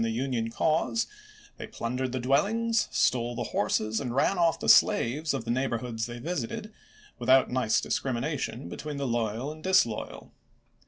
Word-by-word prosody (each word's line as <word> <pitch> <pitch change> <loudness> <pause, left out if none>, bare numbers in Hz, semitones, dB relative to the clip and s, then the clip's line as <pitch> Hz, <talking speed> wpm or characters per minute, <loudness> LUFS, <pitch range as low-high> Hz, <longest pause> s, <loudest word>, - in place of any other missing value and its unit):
the 115 - 0
Union 120 -1 -1
cause, 160 - +1 0.5
they - - -7
plundered 125 +2 -3
the 130 - -2
dwellings, 210 - +1
stole 120 -2 +1
the 120 - -2
horses, 110 +1 0
and 125 -3 -4
ran 170 - +2
off 165 -2 +2
the - - -4
slaves 150 +7 +4
of 130 -5 -3
the 115 - -1
neigh 130 +3 +1
borhoods 115 -1 -3
they 120 0 -7
visited, 180 - -4 0.5
without 130 +2 +4
nice 125 -3 +2
discrimination 125 - -2
between 145 - -6
the 140 - -2
loyal 120 +2 -1
and 155 0 -12
disloyal. 185 - 0
130 Hz, 160 wpm, -28 LUFS, 115-150 Hz, 0.5 s, slaves